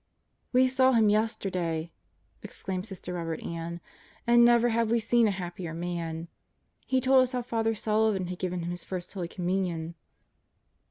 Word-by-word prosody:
"We 255 0 +5
saw 260 0 +4
him 220 -3 +5
yesterday," 180 -6 -1 0.5
exclaimed 185 +1 -5
Sister 185 -3 -6
Robert 165 -2 -4
Ann, 170 +1 -5 0.4
"and 235 0 +6
never 240 0 +5
have 230 -1 +1
we 235 +1 +3
seen 235 +1 +3
a - - +2
happier 175 -3 -5
man! 170 -1 -4 0.6
He 260 0 +2
told 260 +1 +5
us 255 0 0
how 250 -1 -1
Father 225 -2 0
Sullivan 215 -3 +1
had 180 0 -6
given 180 -1 -2
him 170 - -3
his 175 - -5
First 180 -1 -5
Holy 180 -4 -3
Communion." 175 -2 -2
190 Hz, 160 wpm, -28 LUFS, 175-230 Hz, 0.6 s, and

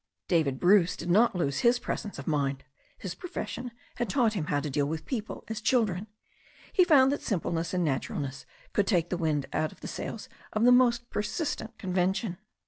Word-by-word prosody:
David 155 -7 +1
Bruce 180 -1 +5
did 175 - -3
not 220 +3 +4
lose 140 -6 0
his 240 +1 +4
presence 210 -3 -4
of 140 - -7
mind. 140 -3 0 0.3
His 190 -3 -5
pro 360 - -9
fession 255 -7 -4 0.3
had 240 -3 -1
taught 225 +1 +2
him 170 -8 -2
to 145 +1 0
deal 140 0 0
with 160 +1 -4
people 220 -5 -4
as 220 -1 -4
children. 215 -5 +1 0.7
He - - +4
had 355 - +5
found 270 -5 +6
that 285 - -2
simpleness 170 -5 -1
and 180 -1 0
naturalness 140 -1 -3 0.3
could 200 -2 +2
take 175 -5 +1
the - - +1
wind 155 -4 0
out 155 - 0
of - - -18
the - - -6
sails - - -5 0.3
of 215 - +1
the 245 - +7
most 240 -1 +4
persistent 230 0 -3
convention. 185 0 -1
190 Hz, 195 wpm, -29 LUFS, 160-235 Hz, 0.7 s, the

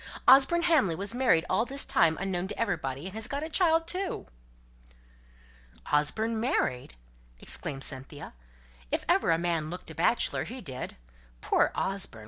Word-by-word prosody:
Osborne 275 +6 +6
Hamley 300 - +3
was 200 +6 -2
married 240 -10 +2
all 190 +4 +1
this 275 +3 0
time 160 -1 +3
unknown 190 -1 -2
to - - -7
everybody, 155 - -2
and 190 - -7
has 220 +1 -5
got 280 +3 -4
a 315 - -5
child 330 -1 +3
too." 365 +2 -3 1.7
"Osborne 220 +10 +2
married!" 125 - -1 0.4
exclaimed 135 0 -5
Cynthia. 135 +2 -5 0.6
"If - - -2
ever - - +2
a 165 - +4
man 165 -2 -1
looked 180 -1 -8
a - - -8
bachelor, 170 +9 +1
he 255 +2 -7
did. 130 - -6 0.4
Poor - - +2
Osborne! 190 - -1
195 Hz, 150 wpm, -28 LUFS, 160-260 Hz, 1.7 s, Osborne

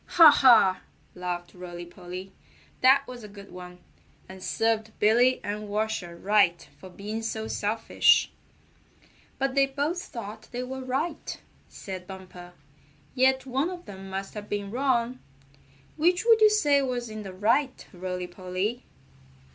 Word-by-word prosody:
"Ha! 325 -3 +11
Ha!" 225 -9 +6 0.3
laughed 180 -1 -5
Rolly 175 -1 -8
Polly. 180 +2 -9 0.5
"That 270 +2 +6
was 245 -2 -9
a - - -8
good 200 -1 -13
one, 180 0 -10 0.5
and 190 0 -11
served 220 +1 -1
Billy 240 +4 +4
and 210 +1 -4
Washer 210 -5 -2
right 190 -2 +2
for 185 - -11
being 210 +4 -5
so 220 -1 -3
selfish." 225 - +2 1.1
"But 270 -1 0
they 275 0 +4
both 290 +6 -2
thought 220 - -8
they 245 0 -3
were 260 +1 -6
right," 290 +5 -3 0.3
said 185 -2 -8
Bumper, 180 -2 -11 0.6
"yet 260 0 +3
one 270 +6 0
of 360 -1 -8
them 195 -1 -10
must 195 +1 -5
have 210 -1 -8
been 205 -1 -3
wrong. 250 -1 0 0.8
Which 355 +6 +2
would 455 -2 +6
you 430 - +8
say 295 -10 +3
was 250 -3 -2
in 215 -1 -7
the 195 -2 -7
right, 230 +8 0
Rolly 180 0 -4
Polly?" 185 +6 -4
220 Hz, 145 wpm, -27 LUFS, 190-265 Hz, 1.1 s, Ha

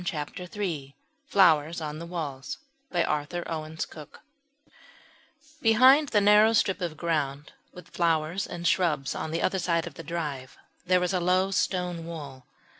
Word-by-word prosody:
CHAPTER 180 0 -4
III 160 -10 -4 0.3
FLOWERS 165 - +4
ON 155 -1 -5
THE 170 - -7
WALLS 145 -6 -5 0.3
Behind 160 -1 -2 2.4
the 210 - +3
narrow 210 +2 +6
strip 200 -3 +1
of 165 -3 -3
ground 150 -4 -2 0.2
with 180 -1 -13
flowers 165 +2 0
and 175 0 -3
shrubs 155 -6 +1
on - - -4
the 165 +2 -2
other 190 0 +1
side 170 -2 0
of 170 - -8
the - - -9
drive 145 -6 -5 0.3
there 180 0 +3
is 180 - -1
a 185 - +1
low 185 +2 +2
stone 180 -3 -1
wall. 140 -6 -8
170 Hz, 135 wpm, -27 LUFS, 150-180 Hz, 2.4 s, narrow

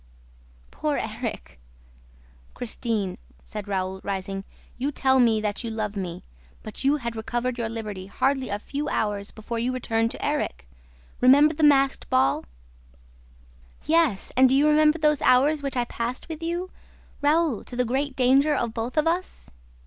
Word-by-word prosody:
Poor - - -1
Erik!" - - -5 1.0
"Christine," 220 -5 -2 0.2
said 210 -2 -7
Raoul, 190 -1 -2
rising, 195 0 -4 0.4
"you 275 +3 -1
tell 265 -2 +2
me 230 -3 +4
that 210 +2 -2
you 230 - -3
love 215 -2 -3
me; 180 -4 -5 0.4
but - - -7
you 275 +2 +4
had 235 -5 -4
recovered 240 +2 -2
your 230 -1 -1
liberty 210 -4 -6
hardly 265 +5 0
a 205 - -1
few 285 +7 -4
hours 205 -1 -1
before 230 +2 -5
you 240 +2 0
returned 230 -3 0
to - - -5
Erik! - - -2 0.5
Remember 285 +5 +6
the 320 - -5
masked 275 -2 +3
ball!" 130 - +2 1.4
"Yes; 315 -10 +2
and 260 0 +6
do 265 - +3
you 290 +2 +4
remember 305 +1 +4
those 300 -2 +2
hours 285 +4 +4
which 275 -2 -3
I 245 - +1
passed 240 +1 -4
with 320 -1 -7
you, 345 +3 -3 0.5
Raoul... 300 -5 +2
to 245 - -9
the 250 0 +1
great 265 +3 -1
danger 270 +4 +4
of 235 -4 -1
both 235 +5 -4
of 305 - +3
us?" 350 +3 -2
250 Hz, 160 wpm, -25 LUFS, 215-285 Hz, 1.4 s, Remember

